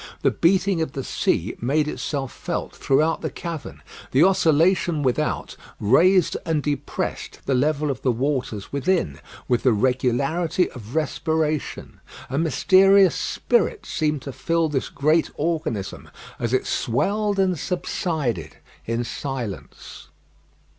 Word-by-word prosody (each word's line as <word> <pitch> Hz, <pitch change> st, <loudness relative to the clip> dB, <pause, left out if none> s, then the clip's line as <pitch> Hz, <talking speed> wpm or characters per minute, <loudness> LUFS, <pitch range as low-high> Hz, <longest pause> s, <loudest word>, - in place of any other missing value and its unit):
The -, -, +4 dB
beating 185 Hz, 0 st, +2 dB
of 155 Hz, -4 st, -2 dB
the 135 Hz, -, -4 dB
sea 100 Hz, -3 st, -1 dB
made 150 Hz, +5 st, +1 dB
itself 140 Hz, -3 st, -3 dB
felt -, -, -4 dB
throughout 155 Hz, +4 st, +1 dB
the -, -, -2 dB
cavern. 165 Hz, -4 st, -7 dB, 0.3 s
The 135 Hz, +5 st, +4 dB
oscillation 170 Hz, -2 st, +3 dB
without 125 Hz, -2 st, -1 dB, 0.2 s
raised 170 Hz, -, +4 dB
and 155 Hz, -3 st, 0 dB
depressed 145 Hz, -1 st, -3 dB
the 135 Hz, -, +1 dB
level 150 Hz, +3 st, +1 dB
of 130 Hz, -, -6 dB
the 130 Hz, -, +2 dB
waters 125 Hz, -4 st, -2 dB
within, 140 Hz, -, 0 dB, 0.3 s
with 120 Hz, -, +2 dB
the 125 Hz, -, +4 dB
regularity 130 Hz, -, +1 dB
of 120 Hz, 0 st, -10 dB
respiration. 155 Hz, 0 st, -1 dB, 0.3 s
A 135 Hz, -, 0 dB
mysterious 190 Hz, +4 st, +5 dB
spirit 470 Hz, -2 st, 0 dB
seemed 150 Hz, -4 st, -1 dB
to 140 Hz, -, -5 dB
fill 165 Hz, +2 st, 0 dB
this 135 Hz, -3 st, -2 dB
great 155 Hz, +3 st, +2 dB
organism, 155 Hz, -, -3 dB, 0.3 s
as 120 Hz, -1 st, -1 dB
it 130 Hz, -, +1 dB
swelled 205 Hz, -, 0 dB
and 185 Hz, -4 st, +1 dB
subsided 155 Hz, -, -2 dB, 0.3 s
in 115 Hz, +1 st, -1 dB
silence. 120 Hz, -, -6 dB
150 Hz, 125 wpm, -23 LUFS, 130-170 Hz, 0.3 s, mysterious